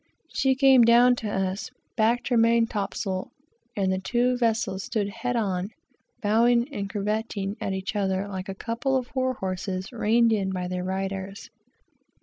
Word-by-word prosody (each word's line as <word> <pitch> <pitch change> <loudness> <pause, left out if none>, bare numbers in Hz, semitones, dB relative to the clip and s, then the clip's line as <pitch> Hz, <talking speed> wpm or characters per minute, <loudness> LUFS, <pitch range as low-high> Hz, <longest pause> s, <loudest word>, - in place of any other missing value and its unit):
She 265 -1 +2
came 265 -1 +6
down 240 +2 +6
to 220 - -4
us, 190 0 -2 0.3
backed 235 +2 +1
her 245 - +2
main 230 0 +4
top 205 -3 -3
sail, 190 -2 -3 0.5
and 190 -2 +1
the 185 - -1
two 245 +5 +1
vessels 230 -5 0
stood 205 -3 -2
"head 235 +4 -3
on," 195 -4 -1 0.5
bowing 235 +3 +3
and 200 -5 -3
curvetting 205 -1 -2
at 200 -3 -2
each 190 +2 -4
other 195 -1 0
like 190 -1 -6
a 195 - -4
couple 245 +6 -2
of 250 -2 -5
war 260 0 0
horses 185 -1 -4
reined 230 0 +3
in 195 -3 0
by 180 -1 -3
their 180 0 -3
riders. 195 +1 -4
210 Hz, 165 wpm, -26 LUFS, 190-235 Hz, 0.5 s, came